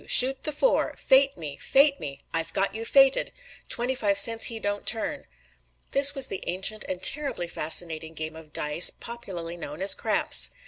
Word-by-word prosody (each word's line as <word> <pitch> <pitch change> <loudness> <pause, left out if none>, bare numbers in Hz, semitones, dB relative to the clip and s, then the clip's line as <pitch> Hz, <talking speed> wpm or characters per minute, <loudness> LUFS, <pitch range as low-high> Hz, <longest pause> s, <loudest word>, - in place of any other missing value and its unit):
"Shoot 265 +1 +5
the 305 - -1
four!" 400 +12 0
"Fate 270 +1 +3
me! 150 -4 -7
Fate 280 +1 +2
me!" 140 -1 -8
"I've 165 0 -1
got 195 0 -1
you 225 +1 -6
fated!" 270 +2 +3 0.4
"Twenty 245 +1 -1
five 205 -6 -1
cents 225 +1 +4
he 230 -1 -4
don't 205 -1 -5
turn!" 285 +5 -2 0.6
This 280 +1 +4
was 270 - +2
the 195 - -6
ancient 190 +5 -1
and 185 0 -6
terribly 275 -11 +1
fascinating 160 0 -1
game 155 0 -5
of 160 -1 -14
dice, 150 +4 +3
popularly 180 -8 -9
known 150 -2 -9
as 195 - +6
"craps." - - 0
205 Hz, 175 wpm, -25 LUFS, 165-265 Hz, 0.6 s, as